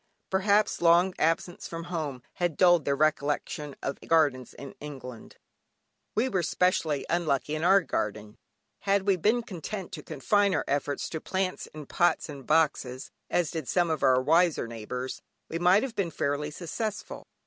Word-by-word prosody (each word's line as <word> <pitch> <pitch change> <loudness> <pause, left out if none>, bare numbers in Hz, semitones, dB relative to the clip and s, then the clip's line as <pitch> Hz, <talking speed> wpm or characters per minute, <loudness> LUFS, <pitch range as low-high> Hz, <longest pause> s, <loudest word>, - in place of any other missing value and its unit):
Perhaps 200 +2 +2
long 175 +2 +5
absence 165 +2 0
from 165 0 -6
home 155 -7 -4
had 175 -3 -1
dulled 175 -3 +5
their 140 - +2
recollection 150 -1 0
of 140 - -3
gardens 145 -6 +2
in 140 -1 -9
England. 130 -5 -9 0.8
We 230 +4 +2
were 190 -8 0
specially 160 -3 +1
unlucky 155 -4 0
in 155 +1 -2
our 195 +3 +6
garden. 105 - -4 0.4
Had 200 -1 +1
we 195 -1 +3
been 215 +7 +2
content 195 -2 -6
to 150 - -6
confine 200 +9 +1
our - - -1
efforts 145 0 -1
to 160 - -5
plants 190 -1 -2
in 155 -1 -10
pots 175 +3 +1
and 140 -3 -9
boxes 140 -5 +1 0.2
(as 175 -4 +1
did 160 -2 -4
some 175 -2 +2
of 155 - -1
our 130 -1 +5
wiser 165 +1 +3
neighbours) 115 +3 -5 0.3
we 165 - -3
might 180 +4 +5
have 265 -4 -3
been 190 -5 0
fairly 145 -1 -1
successful. 195 +7 -5
160 Hz, 160 wpm, -28 LUFS, 145-185 Hz, 0.8 s, our